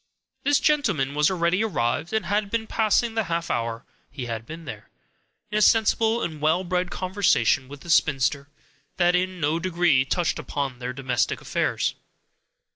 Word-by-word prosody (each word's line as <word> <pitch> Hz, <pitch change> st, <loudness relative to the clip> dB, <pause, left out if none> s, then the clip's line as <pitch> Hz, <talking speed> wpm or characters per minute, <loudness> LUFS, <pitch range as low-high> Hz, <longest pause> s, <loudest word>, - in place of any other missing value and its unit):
This 285 Hz, 0 st, +3 dB
gentleman 205 Hz, -, +1 dB
was 150 Hz, +1 st, +3 dB
already 180 Hz, +2 st, +1 dB
arrived, 155 Hz, -, -1 dB
and 220 Hz, 0 st, -1 dB
had 205 Hz, 0 st, 0 dB
been 225 Hz, +1 st, -1 dB
passing 225 Hz, +1 st, +1 dB
the 225 Hz, -2 st, 0 dB
half 170 Hz, 0 st, -2 dB
hour 115 Hz, 0 st, -2 dB, 0.2 s
he 130 Hz, -1 st, -6 dB
had 115 Hz, -1 st, -5 dB
been 165 Hz, +1 st, -9 dB
there, 110 Hz, -6 st, -9 dB, 0.6 s
in 210 Hz, -, +1 dB
a -, -, 0 dB
sensible 225 Hz, +1 st, +3 dB
and 155 Hz, -3 st, -5 dB
well 160 Hz, +4 st, +2 dB
bred 180 Hz, 0 st, -1 dB
conversation 180 Hz, -, +1 dB
with 140 Hz, +1 st, -11 dB
the 170 Hz, -, -11 dB
spinster, 140 Hz, -2 st, +2 dB, 0.5 s
that 175 Hz, 0 st, +3 dB
in 185 Hz, 0 st, -1 dB
no 155 Hz, +1 st, 0 dB
degree 170 Hz, -6 st, +2 dB
touched 170 Hz, +5 st, -1 dB
upon 135 Hz, -3 st, -4 dB
their 125 Hz, 0 st, -4 dB
domestic 125 Hz, -2 st, -1 dB
affairs. -, -, -1 dB
170 Hz, 165 wpm, -24 LUFS, 135-200 Hz, 0.6 s, This